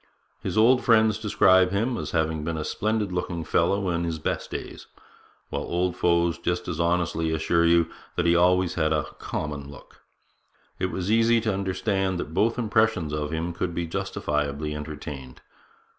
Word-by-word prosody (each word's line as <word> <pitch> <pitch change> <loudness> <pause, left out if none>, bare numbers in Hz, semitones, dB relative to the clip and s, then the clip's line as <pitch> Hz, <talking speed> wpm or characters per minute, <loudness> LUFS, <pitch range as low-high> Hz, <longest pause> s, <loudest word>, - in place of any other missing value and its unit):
His - - -3
old 125 +4 +5
friends 110 -2 +4
describe 95 -3 +4
him 110 +6 0
as - - -4
having 80 -2 0
been 80 0 -3
a 80 - -2
splendid 110 -2 -1
looking 90 -2 -3
fellow 100 +5 +1
in 85 0 -1
his 85 -1 -2
best 75 - -3
days; - - -7 0.6
while - - -2
old 90 +1 -1
foes 85 -1 +2
just 90 +1 -2
as 85 -3 -4
honestly 85 -1 0
assure 85 +1 +2
you 85 -1 +4 0.3
that 85 - 0
he 85 0 +4
always 90 +1 +3
had 80 -2 +1
a 75 -2 +1 0.2
'common' 70 -2 -4
look. 70 - -14 0.8
It 95 - -1
is 95 +2 -2
easy 115 +1 +4
to 110 -2 0
understand 95 -1 -1
that 80 - -5
both 115 +7 +2
impressions 110 -8 +1
of 75 -1 -2
him 80 +2 -3
could 85 0 -3
be 85 - -1
justifiably 75 -5 -2
entertained. 75 -3 -7
85 Hz, 170 wpm, -25 LUFS, 80-100 Hz, 0.8 s, old